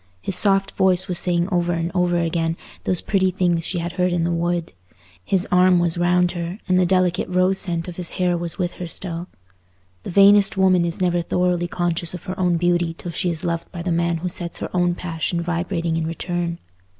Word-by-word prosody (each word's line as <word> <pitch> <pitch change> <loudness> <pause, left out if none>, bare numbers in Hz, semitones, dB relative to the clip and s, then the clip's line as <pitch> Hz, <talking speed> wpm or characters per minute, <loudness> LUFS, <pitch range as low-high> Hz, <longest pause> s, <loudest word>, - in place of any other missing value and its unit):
His 180 - -1
soft 195 -1 +3
voice 185 -1 +2
was 180 -2 +1
saying 175 -1 +1
over 175 -1 +1
and 170 +1 -2
over 180 -1 +1
again 165 0 -1 0.3
those 185 - +2
pretty 190 -2 +1
things 175 -2 0
she 180 - -2
had 170 0 -3
heard 180 0 0
in 175 -1 0
the 170 - 0
wood; 170 - -1 0.5
his 185 - 0
arm 180 0 +5
was 175 -1 +1
round 175 0 +2
her, 175 +2 -5
and 185 -1 +3
the 180 - +3
delicate 185 -1 +1
rose 185 +1 +2
scent 170 -3 -3
of 175 - -8
his 180 -2 -2
hair 180 -1 +1
was 170 -1 -5
with 180 -2 -1
her 180 - -7
still. 170 0 -2 0.7
The - - -7
vainest 200 +2 +5
woman 185 -2 +4
is 170 +2 -3
never 175 -1 +2
thoroughly 180 0 0
conscious 175 0 -1
of 180 - -9
her 185 -1 -6
own 180 -2 +2
beauty 175 -1 +1
till 175 - -6
she 180 +2 -1
is 165 -2 -4
loved 170 -1 -3
by 170 -2 -6
the 180 - -2
man 170 0 +1
who 175 +3 -4
sets 170 -1 -5
her - - -6
own 175 -1 +2
passion 170 -1 -3
vibrating 170 0 -2
in 165 -1 -1
return. 170 0 -3
175 Hz, 215 wpm, -21 LUFS, 170-180 Hz, 0.7 s, arm